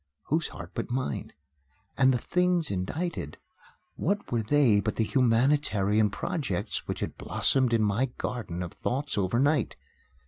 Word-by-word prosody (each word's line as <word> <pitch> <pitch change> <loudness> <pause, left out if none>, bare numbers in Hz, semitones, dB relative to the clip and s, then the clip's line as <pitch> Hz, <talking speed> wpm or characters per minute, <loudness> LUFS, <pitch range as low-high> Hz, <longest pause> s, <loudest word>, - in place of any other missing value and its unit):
Whose 160 +2 +1
heart - - -9
but - - -3
mine? 125 - -2 0.6
And 130 -1 +5
the 125 - +2
things 180 - +1
indited 95 - -3 0.6
what 205 +4 -1
were 120 -2 +1
they 120 -2 +4
but 110 +1 -1
the 115 - +1
humanitarian 115 -4 +2
projects 100 - -3
which - - -4
had - - -4
blossomed 130 -3 +1
in 115 -2 +3
my 105 +6 +2
garden 90 -8 -3
of 85 - -7
thoughts 140 +3 -2
over 100 +2 +1
night? 145 +4 +2
120 Hz, 145 wpm, -28 LUFS, 105-145 Hz, 0.6 s, And